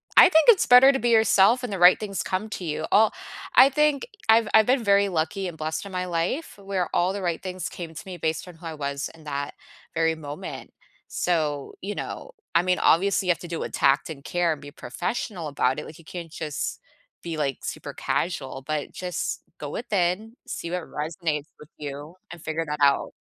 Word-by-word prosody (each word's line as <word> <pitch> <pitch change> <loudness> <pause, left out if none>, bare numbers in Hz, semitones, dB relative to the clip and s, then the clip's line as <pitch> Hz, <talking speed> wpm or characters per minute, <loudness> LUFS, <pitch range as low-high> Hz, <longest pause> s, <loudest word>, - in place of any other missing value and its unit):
I - - +9
think 320 -2 +5
it's 445 -6 +7
better 255 +2 +8
to 270 - -1
be 240 +1 +1
yourself 220 +2 +5
and 235 - -4
the - - -2
right 180 +1 +7
things 200 -3 -3
come 190 +4 -2
to 185 - -5
you. 155 0 -2
Oh, 215 +1 +6 0.5
I 270 - +9
think 300 - +1 0.2
I've 225 -1 +6
I've 220 -1 +7
been 255 -1 +2
very 200 -1 +4
lucky 175 +3 -1
and 170 -3 -7
blessed 160 +4 -3
in 200 - -8
my 180 0 -2
life 180 - -2
where 195 -2 -1
all 180 +2 +2
the 200 - -4
right 170 -2 -1
things 185 -2 -4
came 165 -2 -8
to 155 - -7
me 185 -2 -7
based 160 +1 -2
on 180 - -11
who 165 +1 -14
I 160 - -5
was 140 -1 -3
in 160 -1 -17
that 145 -1 -4 0.4
very 165 0 +1
moment. 145 -1 -8 0.4
So, 150 -5 -1
you 205 +2 -4
know, - - -6 0.2
I 170 - +6
mean, 180 0 +1
obviously, 190 +2 +3
you - - +5
have 170 - -1
to 175 - -8
do 170 -1 -4
it - - -5
with - - -17
tact 135 +3 +2
and 140 -3 -8
care 175 -2 +1
and 145 - -10
be 145 0 -10
professional 180 0 -4
about 130 -2 0
it, - - -7
like, 160 +2 -11
you 165 - -17
can't 170 -2 -8
just 155 -3 -4 0.4
be, 165 -2 -4
like, 140 -3 -1
super - - -5
casual, 135 -6 -2
but 155 -1 -3
just 180 -1 -4 0.2
go 145 - -5
within, 205 +1 -1
see 170 - -5
what 180 -1 -2
resonates 155 -1 -3
with 150 - -14
you, 145 +3 -7 0.2
and 175 -2 -9
figure 160 +1 -2
that 150 0 -3
out. 140 -1 +3
175 Hz, 220 wpm, -25 LUFS, 155-200 Hz, 0.5 s, I